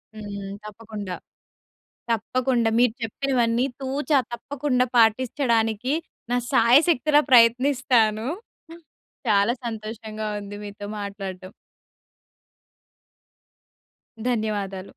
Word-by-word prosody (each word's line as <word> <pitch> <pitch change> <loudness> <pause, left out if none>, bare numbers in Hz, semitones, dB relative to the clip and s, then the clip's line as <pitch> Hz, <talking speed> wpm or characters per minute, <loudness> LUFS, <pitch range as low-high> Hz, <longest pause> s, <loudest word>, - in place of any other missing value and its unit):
హ్మ్. 200 -2 -7
తప్పకుండా. 210 -3 -7 1.0
తప్పకుండా. 235 +1 +1
మీరు 245 -2 +4
చెప్పినవన్నీ 240 0 0 0.2
తూచా 275 +2 +1
తప్పకుండా 255 0 -1
పాటించడానికి 230 +1 +2 0.4
నా 245 - +2 0.2
సాయశక్తులా 290 +4 +5
ప్రయత్నిస్తాను. 240 -2 +4 1.0
చాలా 205 +2 +3
సంతోషంగా 220 -1 -5
ఉంది 205 0 -8
మీతో 205 0 -8
మాట్లాడటం. 195 -2 -6 2.8
ధన్యవాదాలు. 205 -4 -2
225 Hz, 70 wpm, -24 LUFS, 210-255 Hz, 2.8 s, సాయశక్తులా